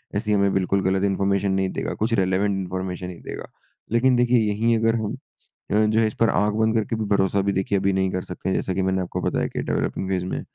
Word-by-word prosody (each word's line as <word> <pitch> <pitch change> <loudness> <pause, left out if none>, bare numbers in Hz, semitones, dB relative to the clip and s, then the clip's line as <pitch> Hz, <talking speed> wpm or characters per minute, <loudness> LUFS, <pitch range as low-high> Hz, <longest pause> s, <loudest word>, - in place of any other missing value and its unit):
ऐसी 105 +1 -1
हमें 100 -1 +3
बिल्कुल 95 +1 +1
गलत 95 +1 +1
इन्फॉर्मेशन 100 0 +1
नहीं 95 0 +1
देगा - - -3
कुछ 115 +2 -1
रेलेवेंट 95 0 +2
इन्फॉर्मेशन 90 -1 -4
ही 90 - -8
देगा। - - -7 0.5
लेकिन 125 +2 +3
देखिए 120 0 +3
यहीं 115 +3 +2
अगर 115 +1 +2
हम 110 -2 -2 0.6
अ, - - +2
जो 110 +1 +2
है 110 - +3
इस 110 - -4
पर 115 - +4
आँख 105 0 +1
बंद 110 +1 +1
करके 110 +1 0
भी 110 -1 -2
भरोसा 95 0 +2
भी 100 0 0
देखिए 95 +1 0
अभी 95 0 +1
नहीं 95 0 +1
कर 95 - -2
सकते 90 +1 -5
हैं - - +1
जैसा 95 - -1
कि 95 - -1
मैंने 95 0 0
आपको 90 - -4
बताया - - 0
कि - - -4
डेवेलपिंग 95 - -2
फेज़ 90 -1 -1
में, - - -3
100 Hz, 245 wpm, -23 LUFS, 95-110 Hz, 0.6 s, पर